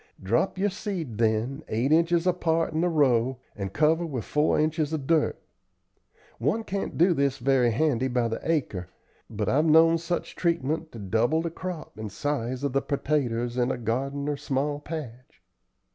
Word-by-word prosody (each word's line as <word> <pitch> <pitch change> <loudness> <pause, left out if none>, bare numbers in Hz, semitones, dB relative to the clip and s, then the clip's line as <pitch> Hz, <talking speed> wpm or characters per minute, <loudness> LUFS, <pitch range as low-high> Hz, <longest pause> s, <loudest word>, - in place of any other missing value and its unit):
Drop 115 - +1
your 200 +1 +1
seed 180 - -5
then, 115 +6 0
eight 120 +6 0
inches 170 +1 +3
apart 165 -3 +1
in 160 - 0
the 175 - +2
row, 130 -5 +2 0.2
and 95 -2 -4
cover 155 - +2
with 135 -9 -4
four 150 +1 +2
inches 155 0 0
of 150 -4 -2
dirt. 160 0 +2 1.0
One 150 - 0
can't 200 -1 -4
do 175 +2 +5
this 140 -3 +1
very 130 -1 +3
handy 130 +1 +1
by 125 -2 +1
the 115 - -3
acre, 105 - -1 0.4
but 105 -2 -3
I've 150 +4 +3
known 165 +1 +6
such 170 +1 -3
treatment 160 -1 -1
to - - -8
double 115 - +1
the 170 - -3
crop 175 -8 -7
and 110 -2 -5
size 130 +1 -2
of 140 -3 -1
the 135 - +2
pertaters 125 -5 -1
in 120 +1 +2
a - - -1
garden 135 +5 -2
or 145 -1 -1
small 145 +2 -1
patch." 140 -6 -8
145 Hz, 175 wpm, -26 LUFS, 120-160 Hz, 1.0 s, known